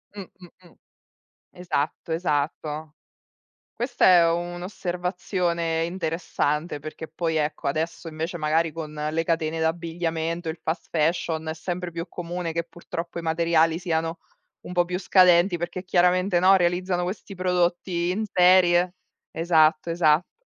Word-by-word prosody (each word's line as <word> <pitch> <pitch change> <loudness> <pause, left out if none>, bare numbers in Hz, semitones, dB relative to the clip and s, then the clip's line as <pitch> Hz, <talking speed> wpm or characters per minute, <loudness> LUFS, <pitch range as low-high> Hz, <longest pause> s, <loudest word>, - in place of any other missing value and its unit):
Mh, 200 - -6
mh, 180 0 -17 0.2
mh. - - -21 0.8
Esatto, 170 -2 -2
esatto. 155 -1 -2 0.8
Questa 245 +1 -1
è 170 -2 +6
un'osservazione 175 -1 -2
interessante 165 -3 -2
perché 155 +2 -8
poi, 160 0 -2
ecco, 150 -1 -1
adesso 160 +3 -3
invece 160 +2 -4
magari 160 +1 +1
con 155 -1 -6 0.2
le 165 +1 -1
catene 165 -1 -1
d'abbigliamento, 165 0 -2
il 160 +1 -4
fast 160 +2 -3
fashion, 160 0 0
è 160 - -2
sempre 175 +2 -4
più 165 0 -5
comune 175 -1 -4
che, 170 0 -2
purtroppo, 170 0 -7
i 170 - -4
materiali 165 0 +2
siano 165 -1 -2 0.4
un 180 - -9
po' 175 -1 +3
più 180 +1 -3
scadenti, 180 -1 +5
perché 175 +2 -5
chiaramente, 180 0 +3
no, 190 +2 +6
realizzano 180 0 0
questi 195 +2 -5
prodotti 175 -1 0
in 210 +4 -1
serie. 180 0 +5 0.4
Esatto, 160 -1 +3
esatto. 165 - +1
170 Hz, 130 wpm, -25 LUFS, 160-180 Hz, 0.8 s, è